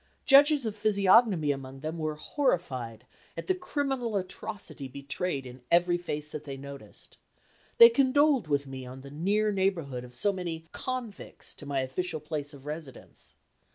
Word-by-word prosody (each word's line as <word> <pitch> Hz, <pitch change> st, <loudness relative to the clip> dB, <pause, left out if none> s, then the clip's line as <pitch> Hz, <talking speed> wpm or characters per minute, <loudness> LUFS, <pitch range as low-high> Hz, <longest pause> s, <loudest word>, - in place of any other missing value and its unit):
Judges 285 Hz, -1 st, +6 dB
of 215 Hz, -2 st, -2 dB
physiognomy 200 Hz, -5 st, +4 dB
among 135 Hz, -1 st, -6 dB
them 160 Hz, +2 st, -4 dB
were 155 Hz, -1 st, -2 dB
horrified 130 Hz, -, -2 dB, 0.3 s
at -, -, -4 dB
the 375 Hz, -, +2 dB
criminal 275 Hz, -, -2 dB
atrocity 185 Hz, -5 st, -5 dB
betrayed 140 Hz, +2 st, -3 dB
in 125 Hz, 0 st, -10 dB
every 175 Hz, +1 st, +4 dB
face 150 Hz, -3 st, -4 dB
that 150 Hz, -, -6 dB
they 140 Hz, -2 st, -6 dB
noticed. 140 Hz, 0 st, -11 dB, 0.6 s
They 470 Hz, -1 st, +11 dB
condoled 280 Hz, -, +3 dB
with 145 Hz, -1 st, +1 dB
me 135 Hz, -1 st, -7 dB
on 130 Hz, +1 st, -9 dB
the 140 Hz, +1 st, -11 dB
near 205 Hz, +8 st, +1 dB
neighborhood 170 Hz, -10 st, -1 dB
of 125 Hz, 0 st, -12 dB
so 205 Hz, +8 st, +1 dB
many 170 Hz, -3 st, -5 dB
convicts 255 Hz, -5 st, -5 dB
to 145 Hz, -, -11 dB
my 140 Hz, -1 st, 0 dB
official 160 Hz, +5 st, -2 dB
place 150 Hz, -1 st, -5 dB
of 140 Hz, -2 st, -14 dB
residence. 150 Hz, -2 st, -9 dB
165 Hz, 155 wpm, -29 LUFS, 140-215 Hz, 0.6 s, They